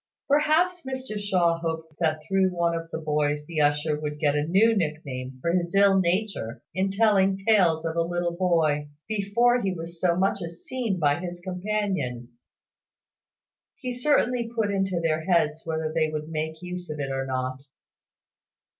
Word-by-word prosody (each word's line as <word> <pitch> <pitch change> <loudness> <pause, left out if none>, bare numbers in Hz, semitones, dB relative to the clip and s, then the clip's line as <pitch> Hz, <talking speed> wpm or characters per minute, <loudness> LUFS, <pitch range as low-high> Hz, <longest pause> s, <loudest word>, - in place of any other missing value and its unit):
Perhaps 315 +5 +3
Mr 260 -5 -5
Shaw 180 -5 +2
hoped 160 -2 -4
that 155 -2 0
through 190 -1 +3
one 170 -1 0
of 165 0 -5
the - - -4
boys 150 -1 0
the 155 -1 -1
usher 150 +1 +1
would 150 -1 -4
get 145 -1 +2
a 150 +1 0
new 215 +6 +4
nick 160 -5 -1
name 130 -1 -6
for 170 +6 0
his 175 +1 -1
ill 195 -1 +6
nature 185 - -1
in 190 +1 0
telling 195 -2 +3
tales 190 -6 +3
of 165 0 -2
a 170 - +2
little 175 0 -1
boy, 160 -5 +1 0.2
before 220 +4 +2
he 195 -3 0
was 170 -1 -7
so 175 -2 +3
much 195 +2 +1
as 170 0 -8
seen 240 -7 -2
by 145 -2 +2
his 175 -1 -6
companions. 180 - -3 1.3
He 255 -3 -5
certainly 245 -2 +1
put 215 -3 +1
it - - -2
into 195 -2 0
their 160 -1 0
heads, 160 -3 +2
whether 160 -1 -2
they 160 -1 +1
would 155 0 -5
make 160 +1 -4
use 180 -1 -6
of 150 -1 -5
it 135 -1 -2
or 135 0 -2
not. 130 0 -3
170 Hz, 175 wpm, -26 LUFS, 155-195 Hz, 1.3 s, ill